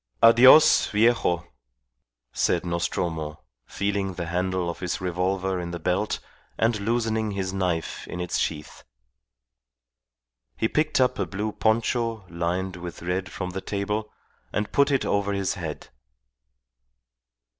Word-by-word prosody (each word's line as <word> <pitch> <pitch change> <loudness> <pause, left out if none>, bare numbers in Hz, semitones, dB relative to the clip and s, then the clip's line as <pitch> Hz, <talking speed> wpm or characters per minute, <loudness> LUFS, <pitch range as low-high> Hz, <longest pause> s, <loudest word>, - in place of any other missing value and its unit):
"Adios, 125 +6 +8
viejo," 105 -6 +2 0.9
said - - +1
Nostromo, 85 -3 -2 0.2
feeling 100 -2 -2
the 85 - -4
handle 90 +1 -1
of 85 - -4
his 90 -2 -2
revolver 95 +1 -1
in 85 -1 -4
the 85 - -4
belt 90 +5 0 0.4
and 115 -1 +1
loosening 110 0 0
his 95 -2 -3
knife 90 -4 -2
in 90 - -6
its 90 0 -1
sheath. 75 0 -4 1.7
He 110 - +1
picked 155 +4 +1
up 125 -4 +2
a 95 - 0
blue 105 +4 -3
poncho 115 0 0
lined 90 +2 -2
with 85 -1 -8
red 90 +2 -2
from 90 -1 -4
the 95 +1 -5
table, 105 +2 -3 0.4
and 105 0 -2
put 140 0 +3
it 140 -2 +1
over 100 0 0
his 100 -1 0
head. 80 -4 -6
95 Hz, 130 wpm, -25 LUFS, 90-110 Hz, 1.7 s, Adios